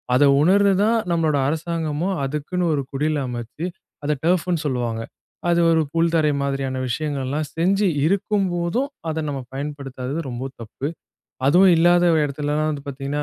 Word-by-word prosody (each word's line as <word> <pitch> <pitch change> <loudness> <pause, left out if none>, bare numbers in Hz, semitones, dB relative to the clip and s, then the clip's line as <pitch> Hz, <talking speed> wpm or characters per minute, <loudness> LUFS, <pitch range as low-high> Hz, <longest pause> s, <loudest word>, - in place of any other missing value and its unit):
அத 145 - +5 0.2
உணர்ந்து 195 +4 +4
தான், 230 +2 +3 0.2
நம்மளோட 160 -3 +2
அரசாங்கமும் 165 +2 -2
அதுக்குன்னு 150 +5 -2
ஒரு 140 - -1
குடில் 150 +2 0
அமைச்சு, 120 +7 -5 0.4
அத 150 - +1
டர்ஃப்ன்னு 175 -1 +1
சொல்லுவாங்க. 120 -4 -2 0.5
அது 170 0 +3
ஒரு 160 -1 +4
புல்தரை 165 -2 +2
மாதிரியான 135 -1 -2
விஷயங்கள் 145 +1 -2
எல்லாம் 150 +3 -2
செஞ்சு 195 +4 +2 0.2
இருக்கும்போதும், 195 - 0 0.2
அத 160 - -2
நம்ம 140 -1 -3
பயன்படுத்தாதது 140 0 -5
ரொம்ப 125 +2 -5
தப்பு. 115 +5 -5 0.6
அதுவும் 180 +5 +6
இல்லாத 175 +1 +5 0.2
இடத்திலல்லாம் 150 +2 -1
வந்து 140 -2 -5
பார்த்தீங்கன்னா, 140 +2 -3
155 Hz, 135 wpm, -22 LUFS, 140-175 Hz, 0.6 s, அதுவும்